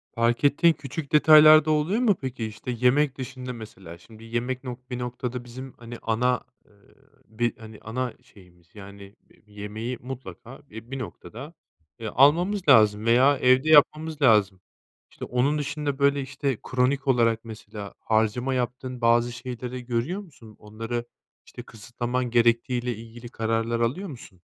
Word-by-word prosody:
Fark 115 +2 +1
ettiğin 160 +4 +4
küçük 140 +1 -7
detaylar 155 0 +8
da 155 - +1
oluyor 160 +10 +1
mu 220 -6 +3
peki? 125 -4 -4
İşte, 110 +3 -6
yemek 130 +4 +2
dışında, 130 -1 -6
mesela, 95 -7 -11
şimdi 110 +5 -16
yemek 120 +3 -3
nok 125 0 -9
bir 125 -1 -4
noktada 125 0 -5
bizim, 130 +2 -9
hani, 120 0 -9
ana, 125 +3 0 0.2
eee, - - -28 0.5
bir, 115 +2 -2
hani, 110 -1 -12
ana 125 +2 -4
şeyimiz, 90 -3 -21
yani, 100 0 -12
bi - - -26
bir 105 - -21
yemeği 110 +4 -5
mutlaka, 130 0 -9
e, 110 +3 -11
bir 135 - -4
noktada, 130 +4 -9 0.5
eee, 115 - -5
almamız 170 - +3
lazım 105 -4 +5
veya 130 +5 +4
evde 130 +4 +3
yapmamız 155 0 +4
lazım. 105 -7 +3 0.5
İşte, - - -8
onun 130 +5 0
dışında, 145 -1 -3
böyle, 140 0 +3
işte 135 -1 -3
kronik 130 +2 +1
olarak 115 -3 +2
mesela, 105 -2 -9
harcama 110 +4 0
yaptığın 125 0 -4
bazı 120 +1 +3
şeyleri 125 0 -7
görüyor 130 - -2
musun? 115 - -16
Onları, 115 +3 -5 0.4
işte, - - -11
kısıtlaman 120 +3 -4
gerektiği 120 +1 +2
ile 120 -2 -3
ilgili 115 +2 -11
kararlar 115 +1 -1
alıyor 145 +12 -1
musun? 100 -9 -12
125 Hz, 155 wpm, -25 LUFS, 115-135 Hz, 0.5 s, detaylar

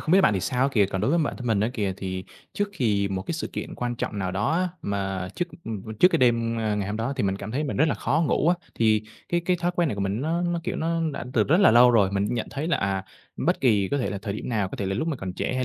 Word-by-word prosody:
không 160 - -1
biết 195 - +7
bạn 105 - +4
thì 95 - 0
sao 125 +6 0
á 135 - +4
kìa, 105 -6 +4
còn 95 -1 -3
đối 110 - +1
với 170 - +3
bản 150 - -1
thân 125 - -7
mình 110 -4 +2
á 110 - +2
kìa 100 -4 -1
thì 95 -1 -4 0.3
trước 205 0 -1
kì 100 -6 +2
một 95 -1 -3
cái 135 - -4
sự 165 - -3
kiện - - -5
quan 120 0 -2
trọng 105 - -3
nào 95 -2 -1
đó 100 +3 0
á, 180 +2 +1
mà 95 -2 -2
trước, 175 - -2 0.2
ừm, 110 -4 -5 0.2
trước 180 - +8
cái - - +1
đêm, 115 -2 +2
ơ, 110 -2 0
ngày 100 -2 -2
hôm 105 +2 -3
đó 115 +5 -1
thì 130 - 0
mình 95 -1 0
cảm 100 +2 -7
thấy 145 +6 -1
mình 140 - -3
rất 155 +3 +4
là - - +1
khó 160 +4 +1
ngủ 155 - +2
á. 175 - +5 0.2
Thì 110 -2 +3 0.3
cái 175 - +1
cái 180 0 +2
thói 175 0 0
quen 175 -2 +2
này 115 - -2
của 100 - -4
mình 100 +3 -1
nó 165 +4 0
nó, 175 -1 -1
kiểu, - - -2
nó 165 +1 0
đã - - -5
từ 110 -5 +3
rất 160 - +3
là - - +7
lâu 120 +2 +7
rồi, 105 -5 +4
mình 100 +1 +1
cũng 120 - -2
nhận 115 - -2
thấy 145 +3 -3
là, 170 - +2
à, 95 -1 -1 0.4
bất - - +2
kỳ 105 -7 +3
có 145 - 0
thể 125 - -1
là 100 - -3
thời 100 - -3
điểm - - -5
nào, 105 -5 0
có - - -7
thể 100 - -2
là 95 - -1
lúc 155 +11 -1
mà 155 - -1
còn 95 -5 -5
trẻ 90 - -2
hay 130 0 0
115 Hz, 335 wpm, -25 LUFS, 100-150 Hz, 0.4 s, trước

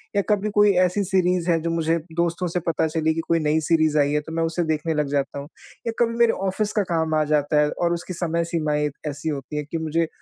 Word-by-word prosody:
या 200 - +4
कभी 210 0 +1
कोई 205 -1 +6
ऐसी 195 +3 0
सीरीज़ 180 -2 +1
है, 165 - +2
जो 165 - -2
मुझे 165 0 +1 0.2
दोस्तों 170 +1 0
से 175 +1 -1
पता 160 -1 +1
चली 160 0 0
कि - - -2
कोई 165 0 +2
नई 155 +1 +1
सीरीज़ 155 -2 +3
आई 145 0 +3
है, 150 - +2
तो 160 - -10
मैं 165 0 0
उसे 165 +1 -1
देखने 160 0 -1
लग 150 -1 0
जाता 140 0 -1
हूँ। 140 - -8 0.4
या - - +1
कभी 230 -1 +2
मेरे 235 -1 +4
ऑफ़िस 205 +2 -1
का 210 - +2
काम 160 -1 0
आ 155 - +3
जाता 150 0 +3
है, 150 - +2
और 175 -1 0
उसकी 175 +2 -5
समय 170 -1 -1
सीमाएँ 150 -3 0 0.2
ऐसी 145 +3 -4
होती 145 0 -5
हैं 150 - -3
कि 165 - -1
मुझे 160 +1 0
165 Hz, 255 wpm, -23 LUFS, 155-175 Hz, 0.4 s, कोई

